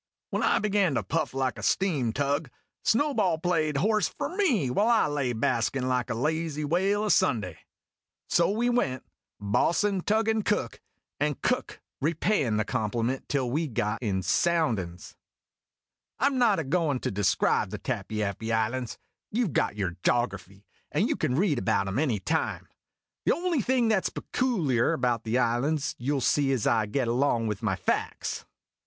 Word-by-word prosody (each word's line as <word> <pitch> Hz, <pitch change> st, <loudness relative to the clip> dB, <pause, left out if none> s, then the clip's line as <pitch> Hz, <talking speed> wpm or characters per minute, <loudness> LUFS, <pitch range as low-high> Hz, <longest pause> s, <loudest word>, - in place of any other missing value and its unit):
When -, -, -1 dB
I -, -, +3 dB
began 200 Hz, -7 st, +1 dB
to 115 Hz, -, 0 dB
puff 95 Hz, -, -1 dB
like 130 Hz, -3 st, -2 dB
a -, -, -7 dB
steam 150 Hz, -, +1 dB
tug, 140 Hz, +3 st, -1 dB, 0.3 s
Snowball 230 Hz, -, +2 dB
played 160 Hz, -3 st, 0 dB
horse 215 Hz, +6 st, +2 dB
for 360 Hz, -, -5 dB
me 245 Hz, -, +2 dB
while 205 Hz, -, +2 dB
I 235 Hz, -2 st, +4 dB
lay 145 Hz, -4 st, -1 dB
baskin' 120 Hz, +2 st, 0 dB
like 125 Hz, -1 st, 0 dB
a -, -, -1 dB
lazy 155 Hz, +3 st, -1 dB
whale 190 Hz, +7 st, +1 dB
o' 215 Hz, -, -1 dB
Sunday. 110 Hz, -, +1 dB, 0.7 s
So 170 Hz, -, +3 dB
we 225 Hz, +4 st, 0 dB
went 135 Hz, -, 0 dB, 0.4 s
Bo's'n 175 Hz, -, +1 dB
tugging 220 Hz, +1 st, +1 dB
Cook, 205 Hz, -, -1 dB, 0.4 s
and 150 Hz, -1 st, 0 dB
Cook -, -, -1 dB, 0.2 s
repayin' 150 Hz, -, +1 dB
the 110 Hz, -, 0 dB
compliment 115 Hz, +5 st, -2 dB
till 130 Hz, -4 st, 0 dB
we 155 Hz, +4 st, 0 dB
got 105 Hz, -3 st, -2 dB
in 95 Hz, -5 st, -1 dB
sounclin's. 115 Hz, -, 0 dB, 1.0 s
I 250 Hz, -, +1 dB
'm 275 Hz, -2 st, +2 dB
not 225 Hz, -5 st, +4 dB
a 160 Hz, -, -1 dB
goin' 145 Hz, -2 st, 0 dB
to -, -, -2 dB
describe 100 Hz, -2 st, +1 dB
the -, -, -5 dB
Tappy 110 Hz, -1 st, -3 dB
appy 105 Hz, +3 st, -3 dB
Islands. 115 Hz, +2 st, -1 dB, 0.3 s
You 240 Hz, +3 st, 0 dB
Ve 180 Hz, -, -3 dB
got 105 Hz, -, 0 dB
your 95 Hz, -4 st, -3 dB
Jography, 100 Hz, -5 st, -1 dB, 0.3 s
and -, -, +1 dB
you -, -, +1 dB
can 125 Hz, -, -1 dB
read 160 Hz, -5 st, +2 dB
about 95 Hz, +1 st, +1 dB
'em 95 Hz, +6 st, -1 dB
any 135 Hz, -8 st, +1 dB
time. 160 Hz, -, -2 dB, 0.6 s
The -, -, +3 dB
only 345 Hz, -5 st, 0 dB
thing 245 Hz, 0 st, +2 dB
that 215 Hz, -4 st, +2 dB
's -, -, -3 dB
pecooliar 165 Hz, -, 0 dB
about 120 Hz, -3 st, 0 dB
the 110 Hz, +3 st, +1 dB
islands 135 Hz, +5 st, 0 dB
you 130 Hz, +4 st, -1 dB
'11 140 Hz, -, 0 dB
see 135 Hz, +2 st, +2 dB
as 120 Hz, -5 st, -1 dB
I 110 Hz, -2 st, +2 dB
get 125 Hz, +3 st, -1 dB
along 120 Hz, -1 st, +1 dB
with 105 Hz, -2 st, -3 dB
my 105 Hz, -4 st, 0 dB
facts. 90 Hz, -, -2 dB
140 Hz, 175 wpm, -27 LUFS, 115-190 Hz, 1.0 s, I